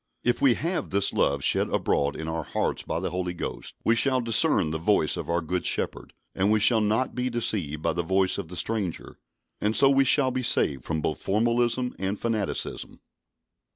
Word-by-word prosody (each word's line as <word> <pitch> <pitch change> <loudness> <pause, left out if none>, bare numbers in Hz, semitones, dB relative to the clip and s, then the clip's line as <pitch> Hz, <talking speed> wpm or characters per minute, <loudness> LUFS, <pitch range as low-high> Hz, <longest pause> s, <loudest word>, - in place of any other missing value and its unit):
If 120 - +1
we 130 -4 +5
have 170 +3 -2
this 100 +1 +1
love 70 -1 +1
shed - - +1
abroad 70 0 0
in 80 - -6
our 80 0 -2
hearts - - -2
by - - -3
the - - -3
Holy 90 0 -3
Ghost, - - -6
we 115 - +4
shall 130 +2 +2
discern 115 - +3
the 80 - -3
voice 80 -3 +2
of - - -6
our 85 0 +1
Good 90 +2 -3
Shepherd, - - -2 0.2
and 95 +2 +1
we 110 - +3
shall 110 +2 +3
not 110 +5 0
be 125 0 -2
deceived 95 -11 -1
by 85 - +1
the 85 - -1
voice 95 +2 +1
of - - -6
the 90 +2 -8
stranger; 105 -7 -3 0.4
and 105 +1 0
so 135 0 +5
we 135 0 +4
shall 135 0 +3
be 130 0 -2
saved 70 - +1
from 80 -1 -2
both 75 - -3
formalism 120 +4 0
and 95 +2 -2
fanaticism. 110 -3 -3
105 Hz, 200 wpm, -26 LUFS, 85-120 Hz, 0.4 s, we